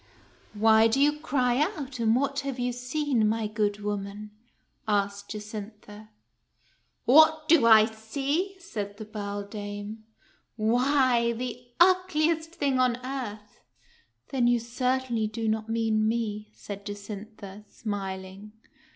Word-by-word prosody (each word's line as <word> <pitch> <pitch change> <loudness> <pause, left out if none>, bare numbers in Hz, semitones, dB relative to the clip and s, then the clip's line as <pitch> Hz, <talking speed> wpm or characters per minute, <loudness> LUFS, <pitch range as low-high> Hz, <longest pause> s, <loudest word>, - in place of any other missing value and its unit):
" - - -31
Why 220 +1 +5
do 230 +4 +1
you 295 +1 +3
cry 250 -3 +1
out, 280 -4 -2
and 225 0 +3
what 275 +2 0
have 275 -2 -4
you 245 0 -1
seen, 250 -2 0
my 220 0 -1
good 210 -1 -1
woman?" 205 0 -4 0.6
asked 200 -1 -1
Jacintha. 210 0 -8 0.5
" - - -41
What 310 +3 +6
do 300 -8 +5
I 220 -1 +8
see? 275 - -2
" - - -25
said 205 - -6
the 215 - -7
beldame. 205 0 -6 0.4
" - - -41
Why, 240 +1 +2
the 245 +1 -6
ugliest 335 -3 +3
thing 275 -4 0
on 250 -2 +2
earth." 215 -6 -6 0.7
"Then 250 -3 +1
you 240 0 +4
certainly 245 -1 -1
do 225 +1 -4
not 220 0 -1
mean 225 -1 +1
me," 215 -2 -2
said 200 -1 -8
Jacintha, 205 0 -8
smiling. 195 -1 -6
225 Hz, 135 wpm, -27 LUFS, 210-260 Hz, 0.7 s, I